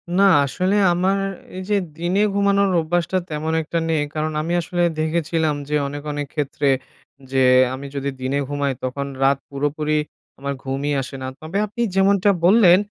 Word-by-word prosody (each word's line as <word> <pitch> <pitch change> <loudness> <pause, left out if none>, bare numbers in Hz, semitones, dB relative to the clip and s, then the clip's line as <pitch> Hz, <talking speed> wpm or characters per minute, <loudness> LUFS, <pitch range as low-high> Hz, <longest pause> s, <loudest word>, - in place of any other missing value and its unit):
না 195 - +4 0.2
আসলে 185 +8 0 0.2
আমার 185 +3 +1 0.4
এই 185 - -5
যে 210 - +3 0.2
দিনে 180 +4 0
ঘুমানোর 200 0 +3
অভ্যাসটা 175 +3 0
তেমন 155 +1 -2
একটা 165 +2 -3
নেই 160 -2 +2
কারণ 155 0 -1
আমি 165 +3 -2
আসলে 175 +1 -1 0.2
দেখেছিলাম 160 -1 0
যে 150 - 0
অনেক, 145 +1 -6
অনেক 145 -1 -3
ক্ষেত্রে 145 -1 0 0.6
যে 135 -1 +3 0.3
আমি 140 +2 -6
যদি 140 0 -2
দিনে 135 +2 0
ঘুমাই 145 -1 -1
তখন 140 +2 -3 0.2
রাত 135 0 +4
পুরোপুরি 150 +2 -1 0.4
আমার 140 0 -3
ঘুমই 135 +2 -2
আসে 135 +1 -7
না। 130 - -4
তবে 160 +5 -4
আপনি 215 +3 -6
যেমনটা 195 +1 +4 0.2
বললেন 185 -3 +7
155 Hz, 165 wpm, -21 LUFS, 140-180 Hz, 0.6 s, বললেন